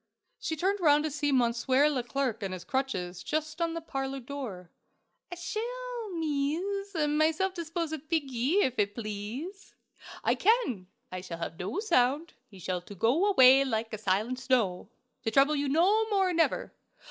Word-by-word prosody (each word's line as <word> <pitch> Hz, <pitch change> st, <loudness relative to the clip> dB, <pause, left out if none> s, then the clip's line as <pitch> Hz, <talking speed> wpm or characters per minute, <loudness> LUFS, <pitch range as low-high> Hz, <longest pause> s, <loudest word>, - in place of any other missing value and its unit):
She 320 Hz, -, -2 dB
turned 385 Hz, +6 st, 0 dB
round 300 Hz, -4 st, +4 dB
to 310 Hz, -, -2 dB
see 290 Hz, 0 st, 0 dB
Monsieur 255 Hz, +2 st, +3 dB
Leclerc 255 Hz, -4 st, -1 dB
on 195 Hz, -2 st, -3 dB
his 180 Hz, -1 st, -6 dB
crutches, 185 Hz, -7 st, -2 dB
just 310 Hz, +1 st, -3 dB
in 335 Hz, 0 st, 0 dB
the 330 Hz, -, -3 dB
parlor 270 Hz, -3 st, -4 dB
door. 240 Hz, -9 st, -7 dB, 0.6 s
"I -, -, -4 dB
shall, 475 Hz, +5 st, -5 dB
mees, 335 Hz, +6 st, -2 dB
myself 310 Hz, +4 st, +1 dB
dispose 335 Hz, -2 st, -3 dB
of 310 Hz, 0 st, -7 dB
piggie, 285 Hz, -, +1 dB
if 255 Hz, -3 st, -1 dB
it 205 Hz, 0 st, +1 dB
please. 235 Hz, -, -6 dB, 0.5 s
I -, -, +3 dB
can. 390 Hz, -, +1 dB, 0.2 s
I 185 Hz, 0 st, -5 dB
shall 180 Hz, -2 st, -7 dB
have 165 Hz, -1 st, -6 dB
no 190 Hz, -, -3 dB
sound; 305 Hz, -, +2 dB
he 200 Hz, -, -15 dB
shall 180 Hz, 0 st, -3 dB
to 200 Hz, +3 st, -11 dB
go 250 Hz, -, +2 dB
away 265 Hz, -8 st, +7 dB
like 225 Hz, -4 st, -2 dB
a 215 Hz, -, -4 dB
silent 215 Hz, +5 st, 0 dB
snow, 240 Hz, -9 st, 0 dB, 0.3 s
to -, -, -1 dB
trouble 275 Hz, +6 st, +4 dB
you 285 Hz, -1 st, 0 dB
no 400 Hz, +9 st, +3 dB
more, 385 Hz, -3 st, +2 dB
never!" 330 Hz, -1 st, +1 dB
280 Hz, 165 wpm, -29 LUFS, 230-335 Hz, 0.6 s, away